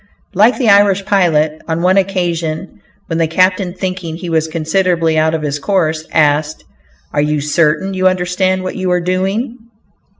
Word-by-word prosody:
Like 215 Hz, +6 st, +4 dB
the 250 Hz, -, 0 dB
Irish 200 Hz, -1 st, +4 dB
pilot, 155 Hz, -6 st, +1 dB
on 165 Hz, +1 st, -2 dB
one 185 Hz, +1 st, +3 dB
occasion 170 Hz, -, -2 dB, 0.2 s
when 165 Hz, 0 st, -3 dB
the 165 Hz, -, +2 dB
captain, 185 Hz, +2 st, +1 dB
thinking 185 Hz, -3 st, -4 dB
he 170 Hz, 0 st, -6 dB
was 160 Hz, -1 st, +1 dB
considerably 165 Hz, +1 st, 0 dB
out 160 Hz, +1 st, +2 dB
of 155 Hz, -, -4 dB
his 145 Hz, -1 st, -2 dB
course, 160 Hz, -2 st, -1 dB
asked, 150 Hz, 0 st, +1 dB, 0.5 s
"Are 145 Hz, -, +1 dB
you 150 Hz, 0 st, 0 dB
certain 155 Hz, +5 st, 0 dB
you 185 Hz, 0 st, +2 dB
understand 185 Hz, +1 st, 0 dB
what 185 Hz, -, -5 dB
you 185 Hz, -1 st, -2 dB
are 180 Hz, 0 st, +2 dB
doing?" 195 Hz, +8 st, -2 dB
175 Hz, 165 wpm, -15 LUFS, 155-185 Hz, 0.5 s, Like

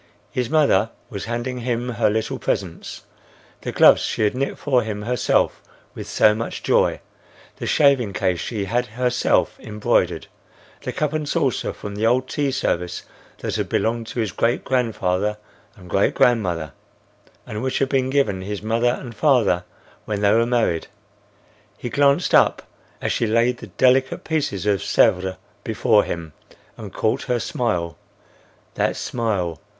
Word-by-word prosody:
His 125 Hz, -2 st, -2 dB
mother 140 Hz, -10 st, +3 dB, 0.2 s
was 100 Hz, -3 st, -5 dB
handing 120 Hz, +2 st, -3 dB
him 120 Hz, 0 st, -2 dB
her 115 Hz, -3 st, +1 dB
little 110 Hz, +1 st, -2 dB
presents,—the 90 Hz, -4 st, -6 dB
gloves -, -, +6 dB
she -, -, -1 dB
had 105 Hz, -, +2 dB
knit 135 Hz, +2 st, -2 dB
for 130 Hz, -4 st, +2 dB
him 105 Hz, -2 st, -4 dB
herself 125 Hz, +1 st, +1 dB, 0.3 s
with -, -, -8 dB
so 105 Hz, -, +4 dB
much 115 Hz, +2 st, -5 dB
joy; -, -, +2 dB, 0.6 s
the -, -, -5 dB
shaving 135 Hz, -8 st, +3 dB
case 90 Hz, -2 st, 0 dB
she 105 Hz, -4 st, -3 dB
had 120 Hz, +5 st, 0 dB
herself 125 Hz, +2 st, 0 dB
embroidered; 105 Hz, -1 st, 0 dB, 0.6 s
the -, -, -4 dB
cup 150 Hz, -1 st, -1 dB
and 155 Hz, -1 st, -2 dB
saucer 140 Hz, -7 st, 0 dB
from 105 Hz, -, -8 dB
the 105 Hz, +2 st, 0 dB
old 130 Hz, +2 st, +2 dB
tea 145 Hz, +1 st, -1 dB
service 90 Hz, -9 st, -2 dB, 0.4 s
that -, -, -2 dB
had -, -, -2 dB
belonged 115 Hz, 0 st, 0 dB
to 120 Hz, -, -5 dB
his 110 Hz, -4 st, -1 dB
great 115 Hz, +4 st, 0 dB
grandfather 105 Hz, -5 st, 0 dB, 0.4 s
and 90 Hz, -3 st, -14 dB
great 100 Hz, +3 st, +1 dB
grandmother 90 Hz, -, +1 dB, 0.7 s
and 105 Hz, 0 st, -5 dB
which 130 Hz, 0 st, -1 dB
had 135 Hz, -, +1 dB
been 130 Hz, -1 st, +1 dB
given 130 Hz, -9 st, +1 dB
his 100 Hz, +2 st, -5 dB
mother 115 Hz, +3 st, +1 dB
and 120 Hz, -3 st, -8 dB
father 115 Hz, -, +2 dB, 0.4 s
when 105 Hz, -1 st, -3 dB
they 100 Hz, -1 st, +4 dB
were 115 Hz, +2 st, +3 dB
married. 115 Hz, -9 st, 0 dB, 0.9 s
He 120 Hz, -, -5 dB
glanced 140 Hz, +1 st, +3 dB
up -, -, +4 dB, 0.4 s
as -, -, 0 dB
she 115 Hz, -, 0 dB
laid 115 Hz, +3 st, +2 dB
the 115 Hz, -, -9 dB
delicate 130 Hz, +6 st, +2 dB
piece 155 Hz, -2 st, -1 dB
of 100 Hz, -2 st, +2 dB
Sèvres 95 Hz, +1 st, +2 dB, 0.3 s
before -, -, +3 dB
him, 85 Hz, -3 st, -5 dB, 0.4 s
and 105 Hz, -4 st, -9 dB
caught 110 Hz, +7 st, -1 dB
her 125 Hz, -2 st, 0 dB
smile—That 90 Hz, -11 st, -4 dB
smile! 100 Hz, -9 st, -2 dB
115 Hz, 155 wpm, -22 LUFS, 100-125 Hz, 0.9 s, gloves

